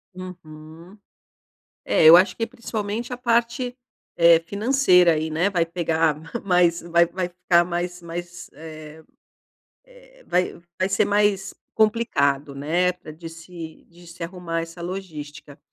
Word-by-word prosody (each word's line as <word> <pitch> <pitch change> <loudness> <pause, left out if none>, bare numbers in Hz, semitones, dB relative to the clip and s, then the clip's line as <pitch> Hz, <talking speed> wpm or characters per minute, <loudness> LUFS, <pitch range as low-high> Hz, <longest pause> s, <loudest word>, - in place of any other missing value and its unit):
Uhum. 170 0 -11 0.9
É, - - +3
eu 160 +2 +11
acho 185 +1 +4
que 230 - -2
principalmente 230 -1 -5
a 250 - -4
parte, 240 +1 0 0.4
eh, 170 -1 +6
financeira 200 -5 +4
aí, 160 0 -2
né, 165 +5 +1
vai 175 -4 +1
pegar 165 -2 0 0.3
mais 180 -2 +3
vai 170 0 +3
vai 175 +1 -3
ficar 180 -1 +2
mais 175 0 -4
mais, 175 +1 -8
eh 155 +1 -11 0.8
eh, - - -20
vai 180 -1 -1 0.2
vai 185 - +1
ser 195 +2 +2
mais 205 -1 +1 0.2
complicado, 180 - +1
né, 170 +6 0
para 180 -3 -13
de 165 +2 -9
se 165 -1 -11
de 175 +1 -18
se 170 +1 -11
arrumar 170 -1 -4
essa 165 +1 -8
logística. 155 -5 -8
175 Hz, 135 wpm, -23 LUFS, 165-200 Hz, 0.9 s, eu